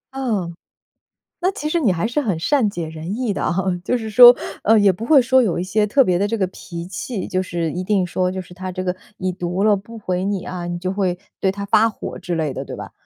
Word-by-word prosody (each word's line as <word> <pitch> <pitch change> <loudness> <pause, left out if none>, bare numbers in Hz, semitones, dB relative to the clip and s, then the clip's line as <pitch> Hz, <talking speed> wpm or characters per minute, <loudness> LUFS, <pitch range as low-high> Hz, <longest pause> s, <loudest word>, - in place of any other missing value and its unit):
嗯， 210 -11 -2 0.9
那 370 +2 +2
其 300 - -5
实 310 - 0
你 230 -9 +3
还 180 +4 -1
是 245 +6 -1
很 200 - -1
善 240 - +2
解 170 -5 -5
人 160 +6 -6
意 245 -5 -1
的 - - -3
啊， - - 0 0.3
就 250 - 0
是 220 -2 -5
说， 245 +3 +10 0.3
呃， 220 +1 +5
也 200 -2 +5
不 220 +6 -6
会 285 0 +6
说 260 +1 +4
有 195 -9 0
一 - - -1
些 210 +3 +1
特 265 +6 +3
别 180 -1 +2
的 200 - +1
这 225 +2 -1
个 190 - +1
脾 170 -1 -8
气， 200 +2 -5
就 185 -1 -1
是 170 -2 -2
一 180 - -3
定 190 -2 +1
说 180 +1 0
就 190 - -4
是 180 0 -14
他 185 +1 -6
这 185 +1 -4
个 180 0 -2 0.2
已 185 - -2
读 180 +1 -3
了 215 -1 +5
不 225 +3 -9
回 185 -2 -2
你 200 -1 -2
啊， 180 -1 -5
你 175 0 -4
就 185 +2 -2
会 185 -3 -1 0.2
对 190 - +2
他 200 +1 -6
发 215 +3 +4
火 215 - -7
之 175 - -4
类 155 -4 -1
的， - - -5
对 - - -8
吧？ - - -8
190 Hz, 280 characters per minute, -20 LUFS, 180-225 Hz, 0.9 s, 说